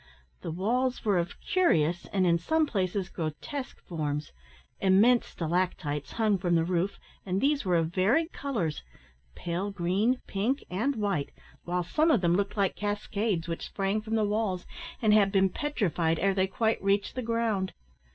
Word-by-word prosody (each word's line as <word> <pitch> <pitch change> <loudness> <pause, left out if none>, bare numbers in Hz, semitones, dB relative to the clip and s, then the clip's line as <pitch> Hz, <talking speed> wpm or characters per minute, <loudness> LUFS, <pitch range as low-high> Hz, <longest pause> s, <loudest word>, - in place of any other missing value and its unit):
The - - -5
walls 240 +10 0
were 200 -4 +3
of 170 - -4
curious, 175 - +2
and 190 -2 +2
in 170 -1 +3
some 315 - +2
places 190 -6 -1
grotesque, 190 - -5
forms. 150 -3 -3 0.5
Immense 205 +6 +4
stalactites 160 -5 -2
hung 215 -4 +2
from 175 -2 +1
the 165 - +3
roof, 180 +3 -1 0.3
and 190 0 -1
these 280 -1 +1
were 180 -2 +2
of 165 0 +1
varied 245 - +2
colours, 215 - -2 0.5
pale 175 +4 -3
green, 200 +6 +1
pink, 225 +8 -1
and 235 +10 0
white, 200 -10 -1 0.4
while 180 +1 -1
some 310 - +2
of 245 - +4
them 170 -1 +3
looked 200 +2 -1
like 195 -2 +1
cascades, 205 -3 -2
which 165 -1 -4
sprang 195 +2 -1
from 220 +1 -3
the 215 -1 +2
walls, 205 -3 -1 0.4
and 215 -1 +5
had 200 -2 +5
been 195 -1 +3
petrified 180 - 0
ere 195 +3 +2
they 190 0 +1
quite 220 +3 0
reached 200 +1 +1
the 255 - -3
ground. 230 -5 0
195 Hz, 165 wpm, -28 LUFS, 175-225 Hz, 0.5 s, and